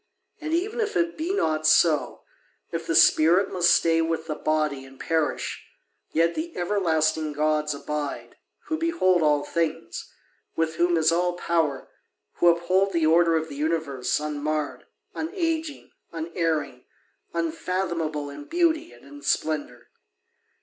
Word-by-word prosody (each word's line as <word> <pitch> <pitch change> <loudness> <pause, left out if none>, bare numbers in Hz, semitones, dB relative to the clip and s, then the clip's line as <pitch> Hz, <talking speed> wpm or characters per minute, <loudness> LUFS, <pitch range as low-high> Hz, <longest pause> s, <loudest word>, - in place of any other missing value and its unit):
And 315 -1 -5
even 400 +8 -1
if 425 -1 -2
it 340 0 0
be 325 +4 -2
not 155 - +1
so, 155 -1 +3 0.5
if 165 -1 -4
the 165 - 0
spirit 170 +7 +5
must 175 -2 +3
stay 165 -1 +3
with 165 0 -1
the 160 - -3
body 150 -3 -1
and 135 0 -15
perish, 160 -3 -1 0.5
yet 165 +1 +2
the 330 +2 -5
everlasting 160 -5 0
gods 150 0 0
abide, 145 0 -5 0.3
who 315 0 -2
behold 325 - +2
all 150 -2 +3
things, 165 0 -3 0.4
with 160 -1 -1
whom 175 0 +3
is 160 0 +3
all 175 +1 +1
power, 165 -5 -1 0.5
who 175 - +3
uphold 185 +3 +3
the 165 -2 +2
order 165 +1 +4
of 160 0 -3
this 140 -1 -8
universe, 150 -5 -1
unmarred, 150 0 -3 0.3
unaging, 325 -3 -3 0.2
unerring, 160 -5 -2 0.5
unfathomable 165 -2 -2
in 145 0 -9
beauty 335 -1 +1
and - - -17
in 290 0 -12
splendour. 145 - -2
165 Hz, 135 wpm, -25 LUFS, 155-185 Hz, 0.5 s, spirit